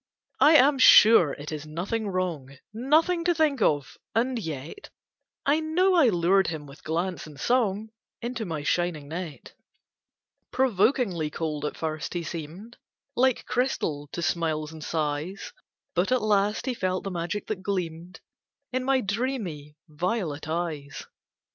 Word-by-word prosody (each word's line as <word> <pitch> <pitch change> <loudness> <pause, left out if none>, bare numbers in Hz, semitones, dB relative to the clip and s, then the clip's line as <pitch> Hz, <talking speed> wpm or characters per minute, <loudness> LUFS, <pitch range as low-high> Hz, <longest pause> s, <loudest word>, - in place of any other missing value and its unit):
I 310 - +7
am 275 0 +6
sure 215 - +8
it 145 +2 -8
is 155 -1 -6
nothing 195 +8 -3
wrong, 170 -8 -3 0.2
Nothing 315 +9 +2
to 350 -1 +3
think 300 -6 +1
of 145 -7 +1 0.2
and 245 +2 +1
yet 160 - -7 0.6
I 290 +3 +3
know 345 +5 +2
I 320 -9 +5
lured 190 +1 +3
him 155 -3 -4
with 140 +1 -14
glance 170 +2 -2
and 145 -2 -13
song, 220 - +1 0.3
Into 235 -1 -4
my 160 -7 -4
shining 160 -3 -1
net; 165 -2 -7 1.0
Provokingly 215 - +1
cold 150 -1 -3
at 150 - -4
first 155 +1 -4
he 175 - -2
seemed, 170 +9 -8 0.4
Like 260 0 +2
crystal 165 - -1
to 170 - -4
smiles 155 -2 -1
and 155 -1 -9
sighs, 155 - -3 0.4
But 180 +6 +1
at 255 -3 +2
last 210 0 +1
he 260 - -1
felt 185 -5 -2
the 195 - -4
magic 175 +3 -3
that 210 -4 -4
gleamed 180 -2 -4 0.5
In 255 0 0
my 265 0 +2
dreamy 200 - -3
violet 160 -1 -3
eyes. 155 -4 -4
185 Hz, 145 wpm, -26 LUFS, 155-240 Hz, 1.0 s, sure